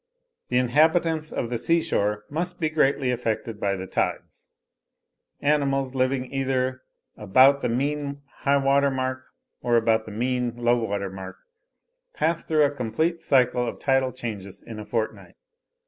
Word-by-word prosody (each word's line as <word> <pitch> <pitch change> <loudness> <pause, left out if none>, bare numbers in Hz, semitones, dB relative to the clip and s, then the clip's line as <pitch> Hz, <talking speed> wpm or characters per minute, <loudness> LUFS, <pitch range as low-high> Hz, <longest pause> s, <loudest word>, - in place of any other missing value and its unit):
The 125 - +1
inhabitants 155 +5 +2
of 120 - -3
the 120 - -1
seashore 105 -11 0
must 175 +4 -3
be 155 -2 0
greatly 140 -4 +2
affected 115 -2 -3
by 100 -1 0
the 95 0 -5
tides; - - -3 0.9
animals 135 -2 +1
living 130 0 -1
either 130 -1 -1 0.3
about 130 +7 +5
the - - 0
MEAN 140 +3 -2
high 140 0 +2
water 140 +1 +3
mark, 130 -1 -2 0.4
or 120 -1 +2
about 110 -1 +2
the 110 - -8
MEAN 125 +2 -1
low 120 0 +1
water 100 -2 -3
mark, 95 -1 -8 0.8
pass 165 0 0
through 155 -2 +2
a 140 - +1
complete 145 +6 -1
cycle 125 -2 +2
of - - -4
tidal 135 -1 +1
changes 110 -6 -7
in 110 -2 -8
a 105 - -7
fortnight. 115 -2 -3
130 Hz, 145 wpm, -25 LUFS, 115-140 Hz, 0.9 s, about